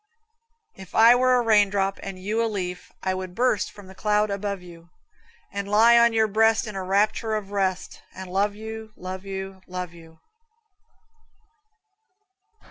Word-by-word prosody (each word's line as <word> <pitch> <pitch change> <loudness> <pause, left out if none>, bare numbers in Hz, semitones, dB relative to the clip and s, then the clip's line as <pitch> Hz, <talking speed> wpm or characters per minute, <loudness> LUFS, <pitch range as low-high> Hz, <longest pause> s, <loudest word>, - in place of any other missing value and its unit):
If 190 -2 -13
I 230 +2 +8
were 255 +1 +3
a 245 - +2
raindrop 200 -3 +2
and 195 -1 -7
you 210 +5 -1
a 230 - 0
leaf, 180 -4 -5
I 190 - 0
would 185 -1 -6
burst 240 -5 +1
from 205 -2 -14
the 190 - -13
cloud 210 +1 +1
above 200 -1 -3
you, 170 -1 -14 0.6
And 200 0 -4
lie 225 +3 +6
on 235 0 +6
your 220 -1 +2
breast 220 +2 +3
in 215 -2 -7
a 190 - -3
rapture 210 +3 +1
of 205 -2 -5
rest, 190 -2 -2
And 185 -1 -8
love 205 +1 +1
you 220 0 -8
love 185 +1 -7
you 190 -1 -6
love 180 -1 -6
you. 165 -1 -16
200 Hz, 160 wpm, -24 LUFS, 185-220 Hz, 0.6 s, I